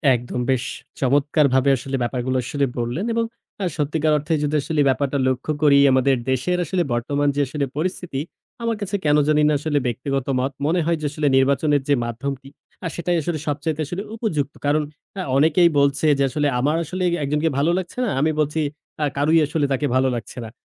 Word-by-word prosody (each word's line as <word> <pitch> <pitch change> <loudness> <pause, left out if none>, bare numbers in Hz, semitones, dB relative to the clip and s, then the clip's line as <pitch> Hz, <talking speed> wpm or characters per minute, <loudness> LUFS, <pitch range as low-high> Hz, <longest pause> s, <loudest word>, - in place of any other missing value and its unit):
একদম 120 +1 -4
বেশ 130 -2 +1 0.4
চমৎকারভাবে 140 0 +3
আসলে 135 +2 -4
ব্যাপারগুলো 125 +1 -1
আসলেই 140 +2 -1
বললেন 120 - -2
এবং 230 0 +1 0.4
আ - - +1
সত্যিকার 155 +1 +1
অর্থে 150 +3 -2
যদি 150 +1 0
আসলে 150 +1 0
ব্যাপারটা 140 +1 0
লক্ষ্য 130 +4 -1
করি 145 -2 +6
আমাদের 130 +1 +3 0.2
দেশের 135 +8 0
আসলে 180 +3 0
বর্তমান 140 +5 0
যে 145 - +1
আসলে 140 +2 -2
পরিস্থিতি 170 -3 -2 0.4
আমার 230 -2 0
কাছে 205 0 -2
কেনো 150 0 +4
জানিনা 150 0 +3
আসলে 145 -1 0
ব্যক্তিগত 130 +2 -2
মত 135 +2 -1
মনে 165 +4 +2
হয় 170 0 +1
যে, - - -3
আসলে 150 -1 -1
নির্বাচনের 140 +2 +2
যে 145 - +5
মাধ্যমটি 135 +3 -5 0.4
আ - - +1
সেটাই 175 0 0
আসলে 155 +1 -2
সবচাইতে 150 +2 -2
আসলে 175 +6 -4
উপযুক্ত। 155 - -2
কারণ 150 +2 +3 0.4
আ - - 0 0.2
অনেকেই 160 +4 +5
বলছে 140 +1 +2
যে 140 - +2
আসলে 145 +2 0
আমার 145 +5 +1
আসলে 185 +4 -4 0.2
একজনকে 150 +3 +1
ভালো 150 +4 +2
লাগছে 185 +4 -5
না, - - -1
আমি 155 +2 +3
বলছি 150 +1 0 0.4
আ - - +3
কারোই 155 +3 +4
আসলে 150 0 0
তাকে 140 +2 0
ভালো 130 +1 +3
লাগছে 120 - -7
না - - -7
145 Hz, 185 wpm, -22 LUFS, 135-160 Hz, 0.4 s, করি